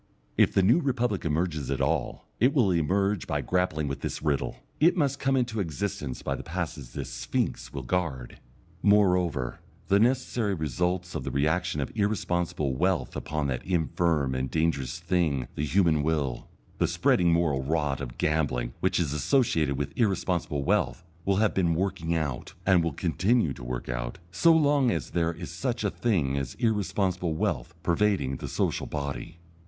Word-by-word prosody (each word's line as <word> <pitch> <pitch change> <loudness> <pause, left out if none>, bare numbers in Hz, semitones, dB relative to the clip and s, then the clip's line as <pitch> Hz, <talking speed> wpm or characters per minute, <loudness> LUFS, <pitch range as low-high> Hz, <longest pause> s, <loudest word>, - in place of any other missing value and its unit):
If - - +3
the 95 - +4
New 115 - +5
Republic 125 - 0
emerges 80 -3 -1
at 70 - -1
all - - -1
it 125 +6 +3
will 115 -9 +4
emerge 95 +4 +1
by - - -1
grappling 90 -5 0
with 70 - -4
this - - -4
riddle; 70 -3 0 0.2
it 170 +5 +4
must 140 -3 +1
come 135 -1 +2
into 120 -3 0
existence 80 -6 -3
by - - -1
the - - -4
passes 65 -4 -5
this - - -5
Sphinx - - -2
will 70 - -5
guard. 65 -4 -2 0.4
Moreover, 90 - +2 0.3
the 100 - +5
necessary 120 -3 +1
results 90 +4 -1
of - - -3
the - - -3
reaction 80 +3 0
of 70 - -3
irresponsible 90 - 0
wealth 80 -4 0
upon 75 -1 -2
that 60 -2 -2
infirm 80 -5 +1
and 65 0 -2
dangerous 80 -4 0
thing 85 -6 0
the 75 - -3
human 80 0 +3
will, 75 -5 -1 0.3
the - - +3
spreading 85 -1 +3
moral 80 -5 +2
rot 75 -1 -1
of - - -6
gambling 65 -6 0
which - - +1
is 75 -5 0
associated 80 - +2
with 70 -1 -3
irresponsible 90 - 0
wealth, - - +1 0.2
will 100 - +2
have 105 +1 +2
been 85 -3 +2
working 85 -2 -1
out, 75 -6 -3
and 95 -3 +5
will 85 - 0
continue 90 - +1
to - - -10
work - - -4
out, - - -3
so 165 - +5
long 145 -5 +4
as - - -2
there 85 -1 +1
is 85 0 -8
such 115 +7 -2
a 100 - +1
thing 75 - 0
as 65 -1 -5
irresponsible 95 -6 0
wealth 80 +1 -2
pervading 85 -7 +1
the - - -6
social - - -1
body. 70 +1 -5
85 Hz, 170 wpm, -27 LUFS, 70-100 Hz, 0.4 s, New